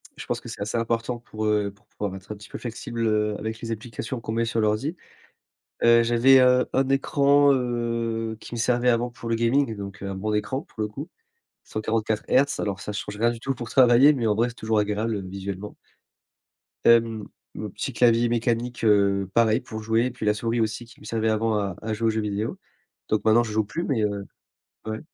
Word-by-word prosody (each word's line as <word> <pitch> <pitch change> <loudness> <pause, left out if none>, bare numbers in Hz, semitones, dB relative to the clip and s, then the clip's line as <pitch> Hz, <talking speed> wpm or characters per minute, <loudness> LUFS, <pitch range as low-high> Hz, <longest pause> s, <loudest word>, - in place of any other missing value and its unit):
Je - - -8
pense - - -2
que - - -9
c'est - - -8
assez 105 +3 -2
important 115 +1 -1
pour, 110 -2 -6
heu, 105 -1 +1
pour 100 - -29
pouvoir 100 -2 -5
être 95 +2 -10
un - - -4
petit 105 +1 -13
peu - - -6
flexible, 115 -1 -3
heu, 105 -1 +1
avec 110 +1 -4
les 115 0 -4
applications 115 +3 -5
qu'on 110 - -5
met 115 +1 0
sur 115 0 -1
l'ordi. 110 +11 0 0.9
Heu, 115 0 +7
j'avais, 120 +3 +5
heu, 125 0 +4
1 135 0 +2
écran, 140 +1 +4
heu, 115 -3 -1
qui - - -9
me - - -4
servait 125 +1 +2
avant 120 +1 +1
pour 120 -1 -8
le 115 - +1
gaming, 115 0 +1
donc 100 0 -8
un 100 -1 -4
bon 105 +3 -2
écran 130 +7 -1
pour 145 - -12
le 105 - -1
coup. 140 - -8 0.6
144 110 0 -2
hertz, 140 +2 +3
alors 100 -2 -2
ça 105 - -5
change 105 0 -5
rien 120 +1 +3
du 115 -1 -6
tout 135 +2 -2
pour 120 -2 -7
travailler 130 +3 +6
mais 120 -5 -1
en 105 - +3
vrai 115 +3 +2
c'est 120 - -9
toujours 110 -1 0
agréable, 105 +1 0
heu, - - -3
visuellement. 95 +1 -6 1.1
Hem 115 -2 +4 0.3
un - - -4
petit - - -4
clavier 120 -1 +4
mécanique 120 +1 -1
heu, 100 -2 +3
pareil 115 -2 +4
pour 110 -1 -7
jouer 115 +2 +2
et - - -1
puis 120 -3 -6
la 105 - +4
souris 115 +2 -1
aussi 110 +2 -1
qui 125 +4 -18
me - - -15
servait 110 -1 -1
avant 110 0 +1
à 100 -4 -2
à 110 - -3
jouer 115 +1 -1
aux - - +4
jeux 110 0 -1
vidéo, 105 +2 -3 0.5
donc 105 -1 0
maintenant 115 +2 +5
je 110 - -5
joue 110 0 +1
plus 170 - -4
mais, 120 -7 0
heu, 100 -1 -2 0.6
ouais 110 0 -3
115 Hz, 220 wpm, -25 LUFS, 105-120 Hz, 1.1 s, Heu